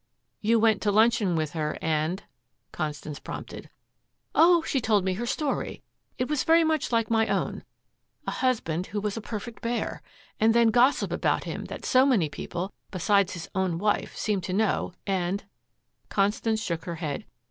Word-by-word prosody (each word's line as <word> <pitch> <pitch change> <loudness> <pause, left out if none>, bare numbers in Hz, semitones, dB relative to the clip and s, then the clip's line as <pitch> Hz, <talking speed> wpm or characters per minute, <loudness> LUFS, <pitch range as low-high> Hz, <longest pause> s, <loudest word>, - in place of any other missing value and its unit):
"You 230 +2 +3
went 220 -2 +3
to 205 - +2
luncheon 215 -3 +3
with 155 -2 -1
her, 155 -2 -2
and 160 +4 -1 0.2
" - - -50
Constance 150 -2 -4
prompted. - - -8 0.6
"Oh, 340 0 +6
she 270 - 0
told 210 -4 +2
me 190 - +1
her 235 +6 -3
story. 290 +3 -2 0.3
It 250 - -1
was 300 -2 0
very 330 +1 +5
much 315 -4 0
like 230 -1 +1
my 225 -1 +3
own - - -1 0.6
a - - -2
husband 190 -10 0
who 205 - -3
was 205 -1 -2
a 225 - -4
perfect 225 +2 -6
bear, 235 0 -2 0.4
and 225 +1 +4
then 235 -1 +5
gossip 245 +5 +3
about - - +1
him - - -5
that - - -7
so 260 +1 +5
many 200 - +3
people, 175 +6 -5 0.2
besides 200 +1 +2
his 170 -3 -6
own 190 -4 0
wife, 205 +3 0
seemed 205 -4 -1
to 185 - -3
know, 210 -1 +1
and 190 0 -1 0.3
" - - -46
Constance 215 +2 +1
shook 165 -3 -3
her 170 - -4
head. 150 -4 -4
210 Hz, 180 wpm, -27 LUFS, 175-230 Hz, 0.6 s, Oh